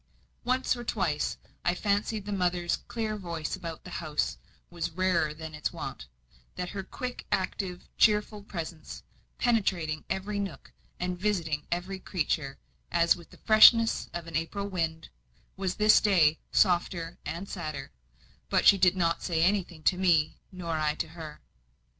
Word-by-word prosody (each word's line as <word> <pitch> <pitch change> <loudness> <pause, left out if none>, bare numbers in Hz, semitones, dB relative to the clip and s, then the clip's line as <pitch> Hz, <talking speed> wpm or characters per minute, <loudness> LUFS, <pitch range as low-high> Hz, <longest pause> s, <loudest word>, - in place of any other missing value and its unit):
Once 255 +1 +1
or 240 - -6
twice 185 -10 -1 0.3
I 175 - +2
fancied 205 +1 0
the 205 - -4
mother's 180 -3 0
clear 220 -2 -2
voice 170 -5 -4
about 165 -2 -7
the - - -10
house 155 -2 -1 0.3
was 170 -1 -3
rarer 175 -2 +1
than 160 +1 -8
its 150 - -2
wont; - - -7 0.5
that 180 0 -3
her 200 - -4
quick, 250 +6 -6
active, 185 -1 -2
cheerful 210 -1 +3
presence 170 -5 -7 0.3
penetrating 185 -10 +1
every 200 +2 -2
nook, 195 -9 -5 0.3
and 180 0 -2
visiting 165 -7 -1
every 180 +3 -2
creature, 155 -7 -2 0.3
as 170 0 +4
with 170 - -14
the - - -16
freshness 225 +1 +6
of 175 -1 -5
an 165 -2 -8
April 180 +5 -2
wind 165 -4 -2 0.5
was 190 -1 -2
this 215 0 +6
day 165 -7 +4
softer 175 -2 +2
and 170 +6 -5
sadder; 155 -7 -5 0.6
but - - +2
she 200 - +8
did 185 0 +4
not 170 -2 +1
say 165 -2 +1
anything 180 -4 0
to 180 - +3
me, 165 -5 +3 0.2
nor 170 -3 -3
I 150 -1 +1
to 160 - -3
her. 160 -2 -9
180 Hz, 155 wpm, -29 LUFS, 160-200 Hz, 0.6 s, she